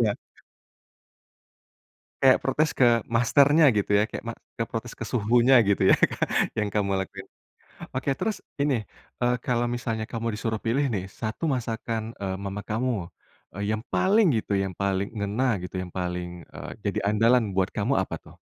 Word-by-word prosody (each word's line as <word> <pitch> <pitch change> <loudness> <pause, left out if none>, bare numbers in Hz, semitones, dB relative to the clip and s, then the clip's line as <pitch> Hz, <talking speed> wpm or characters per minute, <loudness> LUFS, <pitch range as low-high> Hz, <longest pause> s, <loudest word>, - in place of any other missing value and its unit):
Iya. 110 -3 +2 2.1
Kayak 130 -1 +7
protes 150 +3 +1
ke 120 -3 +4
masternya, 140 +6 +5
gitu 105 0 0
ya. 105 - +4
Kayak - - -6
ma 115 - -3 0.2
ke 115 - -1
protes 115 +1 -5
ke - - -6
suhunya 120 +3 +4
gitu 100 - +2
ya, - - +8 0.6
yang 105 -1 +1
kamu 100 -2 +1
lakuin. 95 - -6 0.7
Oke, 135 +2 -1
terus 220 - -2 0.2
ini, 140 -4 +1 0.4
eee, 125 0 +2
kalau 120 -1 +1
misalnya 115 -2 -3
kamu 115 -1 -3
disuruh 110 +1 -2
pilih 135 +5 +2
nih, 100 -6 -2 0.2
1 110 +7 -3
masakan, 115 -4 -2
eee, 95 -1 -3
mama 100 +1 -5
kamu, 110 -5 -2 0.5
eee, - - -1
yang 110 - -8
paling 205 +3 +4
gitu, 100 - -2
yang 95 -1 -1
paling 100 +2 -1
ngena 105 +1 0
gitu, - - -8
yang 90 -1 -5
paling, 90 -1 -3 0.2
eee, - - -8
jadi 100 -1 -2
andalan 110 +1 +3
buat 95 0 +1
kamu 105 +6 0
apa 95 - -3
tuh? - - -16
115 Hz, 160 wpm, -26 LUFS, 100-125 Hz, 2.1 s, ya